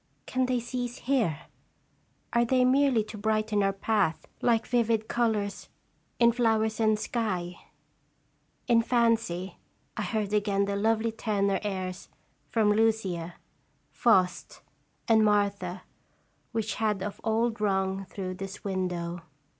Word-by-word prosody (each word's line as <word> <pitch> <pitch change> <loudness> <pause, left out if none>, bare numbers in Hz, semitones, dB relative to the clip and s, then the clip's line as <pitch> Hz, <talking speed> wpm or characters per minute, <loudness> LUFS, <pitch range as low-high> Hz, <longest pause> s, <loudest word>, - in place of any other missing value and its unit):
Can 255 0 0
they 250 -1 +1
cease 245 0 -4
here? 230 - 0 0.9
Are 235 0 +4
they 255 +1 +3
merely 260 -3 +3
to 215 0 -9
brighten 215 0 +1
our 195 0 +2
path, 195 -3 0 0.2
like 230 -2 +2
vivid 230 -2 +1
colors 215 -4 -1 0.5
in 235 -1 +6
flowers 220 -2 +1
and 215 -1 +3
sky? 185 -6 -2 1.1
In 235 -2 +5
fancy 230 -6 0 0.4
I - - -3
heard 210 -2 -2
again 200 -1 +2
the 200 0 -2
lovely 225 +2 +1
tenor 200 -3 0
airs 185 -3 -4 0.4
from 215 -2 +3
"Lucia," 200 -6 0 0.6
"Faust," 185 -6 +1 0.5
and 220 -2 +5
"Martha" 200 -3 +1 0.7
which 225 -1 -2
had 210 -3 +1
of 205 0 -6
old 225 0 0
rung 190 -1 0
through 185 -1 -5
this 195 +1 -8
window. 180 -3 -3
215 Hz, 125 wpm, -28 LUFS, 195-230 Hz, 1.1 s, in